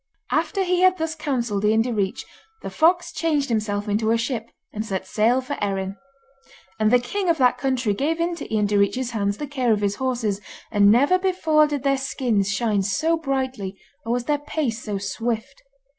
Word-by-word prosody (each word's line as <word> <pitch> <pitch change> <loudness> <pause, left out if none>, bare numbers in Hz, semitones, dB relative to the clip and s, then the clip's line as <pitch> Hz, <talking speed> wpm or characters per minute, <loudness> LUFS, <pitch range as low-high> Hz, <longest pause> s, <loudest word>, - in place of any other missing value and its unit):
After 390 -2 +1
he 360 -1 +1
had 370 0 +5
thus 320 0 -2
counselled 245 -10 -2
Ian 220 +1 +3
Direach, 210 -6 -2 0.4
the - - -5
fox 350 +2 +3
changed 310 -3 0
himself 210 -2 -1
into 215 +2 0
a 230 - +3
ship, 230 -1 -3 0.2
and 215 - -3
set 195 -4 -4
sail 235 +4 +2
for 285 +3 -4
Erin. 195 -1 -2 0.8
And 215 0 +3
the 250 - +6
king 360 +10 -2
of 330 - +3
that 250 -2 +3
country 250 -4 0
gave 305 +9 -1
into 340 0 -3
Ian 215 -1 +2
Direach's 205 +5 +1
hands 200 -2 -1
the 295 - -4
care 260 -4 0
of 210 -1 +2
his 205 0 0
horses, 235 -6 -1 0.3
and 205 -2 +5
never 280 - +4
before 325 -5 +3
did 290 -3 -3
their 275 -1 +2
skins 235 -7 0
shine 205 0 +1
so 210 +13 +1
brightly 260 -10 -3 0.3
or 230 - -1
was 245 0 -1
their 290 +3 0
pace 285 -6 -2
so 205 -2 -3
swift. 225 +5 -3
245 Hz, 190 wpm, -23 LUFS, 210-295 Hz, 0.8 s, the